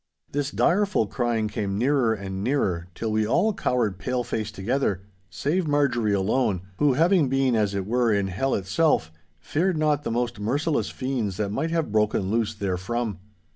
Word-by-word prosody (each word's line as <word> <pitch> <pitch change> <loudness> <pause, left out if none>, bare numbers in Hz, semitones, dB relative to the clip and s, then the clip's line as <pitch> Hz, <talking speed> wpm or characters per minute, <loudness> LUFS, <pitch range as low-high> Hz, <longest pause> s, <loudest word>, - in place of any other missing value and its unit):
This 145 0 -1
direful 190 - +2
crying 115 -1 -1
came 100 -2 -3
nearer 130 0 +2
and 100 -2 -4
nearer, 95 -10 0
till 110 -1 -3
we 110 0 +1
all 215 - +2
cowered 115 - 0
paleface 120 -2 -2
together, 105 -1 -1 0.3
save 155 - -1
Marjorie 140 -7 +2
alone—who, 100 +4 +1
having 165 0 +3
been, 135 -2 +2
as 105 -2 +1
it 95 -1 -2
were, 120 +2 +2
in 100 -2 +2
hell 125 +9 0
itself, 95 - +1 0.3
feared 170 - 0
not 150 -2 +2
the - - -4
most 120 -1 -1
merciless 145 +9 0
fiends 125 -8 -3
that 105 -2 -1
might 155 +11 -1
have 165 -8 -1
broken 105 -2 +1
loose 110 -1 0
therefrom. 100 +2 -2
115 Hz, 160 wpm, -25 LUFS, 100-140 Hz, 0.3 s, having